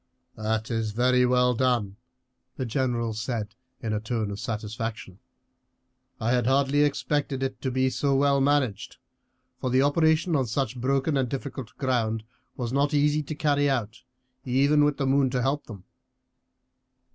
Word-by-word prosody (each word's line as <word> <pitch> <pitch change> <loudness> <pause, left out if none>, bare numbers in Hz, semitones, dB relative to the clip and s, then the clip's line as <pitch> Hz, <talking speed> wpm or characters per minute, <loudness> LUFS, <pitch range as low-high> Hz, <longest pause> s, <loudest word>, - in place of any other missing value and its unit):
"That 110 +1 -2
is 110 -2 -1
very 125 +2 +3
well 125 0 +3
done," 120 -5 0 0.6
the 130 - -2
general 120 -2 -1
said 110 -1 -4 0.3
in 110 -1 -1
a 105 - 0
tone 110 -1 -2
of 100 - -6
satisfaction. 110 -3 -5 1.0
"I 115 +1 0
had 125 -2 +2
hardly 140 +2 +3
expected 145 -1 0
it 135 - -4
to 130 - -1
be 130 +1 +1
so 140 +2 +1
well 140 0 +3
managed; 135 -7 0 0.6
for 130 - -2
the 130 +2 +3
operation 160 +3 +2
on 130 -3 +1
such 125 +1 -1
broken 135 +3 +1
and 130 -3 0
difficult 130 -4 -6
ground 115 -5 0 0.3
was 120 -1 -3
not 140 +2 +2
easy 150 +1 +3
to 150 +1 -6
carry 145 -2 +2
out, 115 -4 -2 0.4
even 140 +4 +3
with 145 -1 +2
the 140 - -1
moon 135 0 +3
to 125 -1 -1
help 140 +2 -1
them." 100 -5 -10
130 Hz, 155 wpm, -26 LUFS, 115-140 Hz, 1.0 s, very